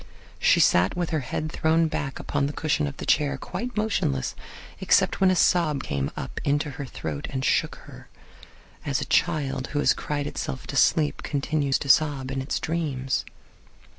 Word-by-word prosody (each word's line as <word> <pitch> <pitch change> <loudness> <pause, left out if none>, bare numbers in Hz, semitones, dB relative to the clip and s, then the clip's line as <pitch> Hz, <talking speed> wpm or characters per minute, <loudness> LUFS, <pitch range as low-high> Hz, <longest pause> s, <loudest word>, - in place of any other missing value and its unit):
She - - +4
sat 90 +2 +4
with 175 -2 -1
her 160 - +1
head 155 +3 -4
thrown 160 +1 +2
back 145 -3 -3
upon 140 -1 -1
the 145 - -5
cushion 155 -1 0
of 140 - -7
the - - -6
chair, 145 -2 +2
quite 240 - -6
motionless, 200 - 0 0.5
except - - +2
when 190 - +6
a 185 - +3
sob 165 -6 +2
came 70 -1 -2
up - - -5
into 145 +1 0
her 140 0 -6
throat 75 - -5
and 130 -1 -3
shook - - +1
her, - - -13 0.7
as 140 -1 -1
a 145 - -3
child 140 -5 0
who 145 - -4
has - - +4
cried 145 -1 -3
itself 65 - -4
to - - -6
sleep 150 -3 +3
continues 145 -1 0
to 145 - -6
sob 140 -3 +3
in 135 0 -2
its 135 - -2
dreams. 145 -6 -2
145 Hz, 180 wpm, -25 LUFS, 135-155 Hz, 0.7 s, when